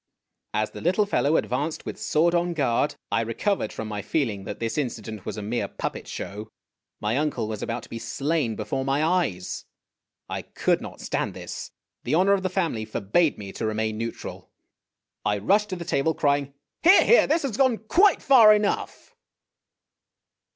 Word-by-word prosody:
As 110 0 0
the - - -9
little 185 +5 +2
fellow 160 -6 +2
advanced 145 +5 -2
with - - -4
sworcl 170 +3 +2
on 175 0 +1
guard, 140 -1 +1 0.2
I 115 +3 +2
recovered 115 - -1
from 110 - -5
my 105 -1 -4
feeling 105 -4 -1
that 105 - -6
this 115 -1 -2
incident 110 -7 -4
was - - -4
a 105 - -4
mere 115 +4 -1
puppet - - -5
show. 105 +2 -6 0.5
My 110 +3 0
uncle 150 -7 -1
was 110 -2 -5
about 115 0 -3
to - - -13
be 115 - -6
slain 135 +1 -1
before 135 - -3
my 135 +3 +1
eyes. 160 - 0 0.6
I - - -4
could - - 0
not - - -9
stand - - -2
this. - - -7 0.3
The - - 0
honor 190 +4 +4
of 195 - +1
the 185 - -1
family 170 - -1
forbade 110 - +1
me 100 -2 -7
to - - -6
remain 110 0 -1
neutral. 115 0 -6 0.7
I 105 -1 +1
rushed 205 - +2
to 185 - -3
the 170 -1 -7
table, 160 +2 +1
crying, 140 -1 0
" - - -60
Here! 365 +4 +7
here! 475 - +6
this 320 +2 +2
has 260 -7 -2
gone 260 -3 +3
quite 365 - +3
far 225 -6 +8
enough 210 -1 -2
140 Hz, 180 wpm, -25 LUFS, 110-185 Hz, 0.7 s, far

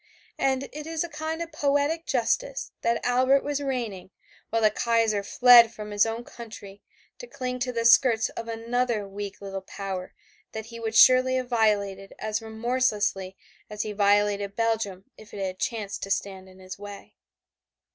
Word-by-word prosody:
And 265 0 +1
it 300 +1 -7
is 325 0 -2
a 345 - -6
kind 320 +2 -4
of 335 - -11
poetic 290 +2 0
justice - - -1
that 235 0 0
Albert 255 +3 +3
was 290 0 -2
reigning, 235 -10 -4 0.4
while 225 0 0
the 215 - +5
Kaiser 225 -2 +1
fled 235 +2 +7
from 210 -1 -8
his 205 +2 +3
own 225 +1 -4
country 215 -5 -11 0.4
to - - -9
cling 250 - -5
to 250 0 -1
the 230 -1 -2
skirts 230 -1 +5
of 230 - -7
another 230 -1 -1
weak 200 0 -7
little 195 -1 -5
power 190 -1 -6 0.4
that 220 -1 -5
he 230 0 -10
would 225 -1 -4
surely 255 +2 +6
have 255 -1 -2
violated 200 -4 0
as 215 +1 -3
remorselessly 220 -4 -1 0.3
as 210 0 -3
he 215 - -4
violated 205 0 +1
Belgium 220 -5 -1
if 215 0 -13
it 195 -1 -3
had 185 0 -5
chanced 210 -4 -3
to 195 - -5
stand 190 -1 -3
in 185 - -17
his 185 +1 -10
way. 205 0 -10
225 Hz, 170 wpm, -26 LUFS, 200-255 Hz, 0.4 s, fled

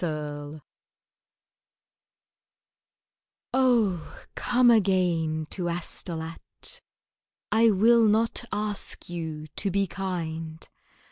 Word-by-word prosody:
ELAINE 150 -2 -4 2.9
OH, 230 -10 +1
come 245 -1 +4
again 175 -7 +2
to 175 -3 -2
Astolat! 165 -1 -4 0.7
I 225 +2 +5
will 225 +3 +5
not 225 +3 +2
ask 210 -3 -3
you 160 -3 -5
to 200 - +1
be 200 +1 +1
kind. 165 -4 -4
180 Hz, 75 wpm, -27 LUFS, 160-215 Hz, 2.9 s, I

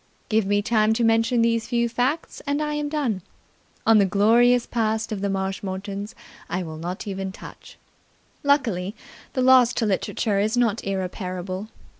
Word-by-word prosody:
Give 215 -2 +2
me 205 0 +2
time 215 0 +3
to 235 +1 0
mention 225 +1 +3
these 230 -1 +1
few 235 -1 +1
facts 255 +7 -2
and 285 +1 0
I 300 0 -1
am 295 0 -2
done. 270 -11 -1 0.6
On 225 -1 +6
the 200 - +5
glorious 235 +5 +4
past 220 -1 -1
of 205 -3 -3
the 200 - 0
Marshmoretons 195 +1 -4 0.3
I 180 +1 -2
will 160 -2 -7
not 175 +3 -5
even 195 -1 -4
touch. - - -12 0.6
Luckily, 225 -9 +1 0.4
the 255 - 0
loss 255 -2 +6
to 230 - 0
literature 200 +1 0
is 215 +4 0
not 230 -2 +1
irreparable. 185 0 -4
220 Hz, 160 wpm, -24 LUFS, 195-240 Hz, 0.6 s, On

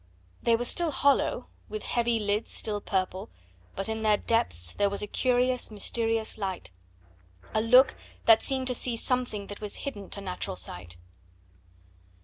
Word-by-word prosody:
they 235 - +3
were 240 +2 -1
still 340 +6 +2
hollow, 280 -1 +2 0.2
with 430 - -5
heavy 235 -1 +1
lids 210 +1 -1
still 210 -1 -3
purple, 185 -1 -2 0.5
but 195 - -2
in 220 0 -3
their 215 -1 +4
depths 85 - 0
there 200 0 +1
was 200 +1 -1
a - - -1
curious, 250 +3 +1
mysterious 225 +1 -1
light, 185 - -4 0.8
a 215 - +2
look 250 +4 +6 0.3
that 225 -1 +7
seemed 265 -2 +1
to 255 - 0
see 245 0 +1
something 245 -4 0
that 205 +1 -9
was 210 -1 -2
hidden 205 -9 -6
to - - -6
natural 185 - -4
sight. 90 -1 -5
220 Hz, 155 wpm, -28 LUFS, 200-245 Hz, 0.8 s, that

